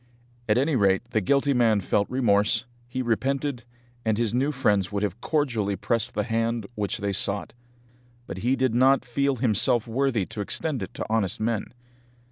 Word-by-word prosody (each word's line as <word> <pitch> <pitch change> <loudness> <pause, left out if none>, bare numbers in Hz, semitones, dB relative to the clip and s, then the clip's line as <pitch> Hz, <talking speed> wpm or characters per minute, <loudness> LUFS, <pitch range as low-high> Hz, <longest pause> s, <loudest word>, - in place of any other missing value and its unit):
At 105 - +4
any 140 +3 +2
rate 95 -3 +3
the 110 - +1
guilty 140 +7 +2
man 115 -4 +3
felt 100 +1 0
remorse, 110 -2 +2 0.2
he 130 +1 -3
repented, 130 +2 -1 0.4
and 110 -2 +1
his 115 -2 0
new 135 +4 +1
friends 105 -9 +1
would 100 0 -2
have 105 +3 -3
cordially 115 -10 0
pressed 115 +4 -1
the - - +1
hand 115 -1 -1
which 105 -3 -2
they 100 0 -2
sought; 100 +1 +1 0.7
but 95 - -7
he 125 +6 +1
did 130 -3 0
not 130 +2 +4
feel 140 +3 0
himself 120 0 +2
worthy 120 -3 0
to 105 - -6
extend 140 +6 -2
it - - -7
to - - -4
honest 110 -4 0
men! 110 -1 -1
115 Hz, 175 wpm, -25 LUFS, 105-130 Hz, 0.7 s, At